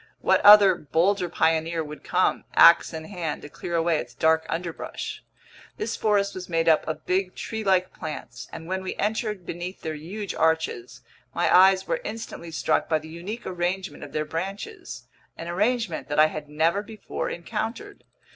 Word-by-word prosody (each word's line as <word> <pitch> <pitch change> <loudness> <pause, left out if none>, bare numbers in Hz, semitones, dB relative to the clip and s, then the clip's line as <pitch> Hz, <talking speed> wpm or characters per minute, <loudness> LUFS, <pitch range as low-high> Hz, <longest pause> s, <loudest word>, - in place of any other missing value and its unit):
What - - +3
other, 205 -2 +9
bolder 175 +4 0
pioneer 165 0 +1
would 150 0 -10
come, - - +1
ax 170 - +7
in 160 -1 -6
hand, 170 -5 -5
to 145 - -9
clear 170 +3 -5
away 165 -1 +2
its 120 0 -8
dark 160 0 +2
underbrush? 170 0 -5 0.5
This 430 - -3
forest 200 -2 +1
was 180 -1 -8
made 165 -1 0
up 160 -2 +4
of 155 -1 -4
big 185 0 0
treelike 195 -5 0
plants, 125 -7 -7
and 165 -1 -8
when 190 +2 -3
we 190 - -5
entered 210 -2 -2
beneath 175 +3 -6
their 160 - -4
huge 185 +7 -6
arches, 145 -8 -1 0.3
my - - +3
eyes 190 +1 +6
were - - -2
instantly 225 - -7
struck 165 - 0
by 160 - +3
the 155 +1 -10
unique 185 +8 -7
arrangement 185 +1 -3
of - - -9
their 155 0 -2
branches—an 190 - -7
arrangement 210 0 -1
that 145 +1 -1
I 155 - +8
had 155 -1 -5
never 165 +6 +1
before 215 0 -5
encountered. 225 - -5
175 Hz, 165 wpm, -25 LUFS, 160-200 Hz, 0.5 s, other